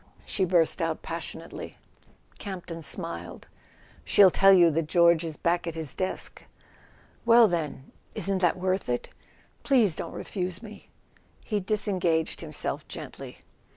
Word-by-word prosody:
she 190 - 0
burst 175 -1 +2
out 165 -1 -2
passionately. 165 0 -7 0.6
Camp 190 -4 -6
ton 165 -1 -7
smiled. 85 - -5 0.3
" - - -27
She'll 195 -3 +6
tell 195 +2 +6
you 175 -3 +6
that 160 0 -1
George 170 0 +4
is 160 -2 -5
back 170 0 0
at 165 - -4
his 160 -4 -4
desk." 185 0 -3 0.8
"Well, 235 0 +7
then—isn't 170 +3 -3
that 180 -1 +2
worth 185 -3 -1
it? 120 0 -2 0.5
Please 230 - +3
don't - - -6
refuse 185 +1 -4
me!" 210 -2 -12 0.6
He 210 -2 -1
disengaged 185 -5 0
himself - - -4
gently. - - -9
175 Hz, 135 wpm, -27 LUFS, 165-195 Hz, 0.8 s, Well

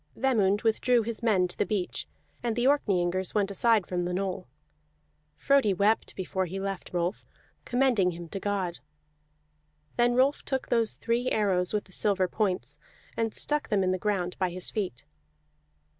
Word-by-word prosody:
Vemund 215 -6 +2
withdrew 235 +1 +3
his 230 0 -4
men 200 -6 +3
to 175 - -6
the - - +1
beach, 200 -5 -3 0.3
and 235 -2 -1
the 240 +1 0
Orkneyingers 190 -10 +1
went 200 -1 +1
aside 220 0 +3
from 180 -1 -2
the 180 0 -2
knoll. 190 -1 -3 0.9
Frodi 270 - +3
wept 205 +4 +1
before 190 0 -2
he 190 +3 -5
left 195 -1 -4
Rolf, 175 +2 -2 0.4
commending 245 -7 +2
him 170 -1 -7
to 195 - -5
God. 190 -4 -2 1.2
Then 240 0 +3
Rolf 270 +3 +3
took 265 -2 -3
those 230 -2 +2
three 240 +2 0
arrows 190 -4 +1
with 205 -3 -3
silver 195 -2 +1
points, 180 - -2 0.4
and 225 -1 0
stuck 295 +6 -1
them 200 -2 +2
in 185 - +1
the 185 - -1
ground 185 -3 -1
by 185 -1 +1
his 180 +1 -4
feet. 190 - -4
200 Hz, 160 wpm, -28 LUFS, 185-230 Hz, 1.2 s, withdrew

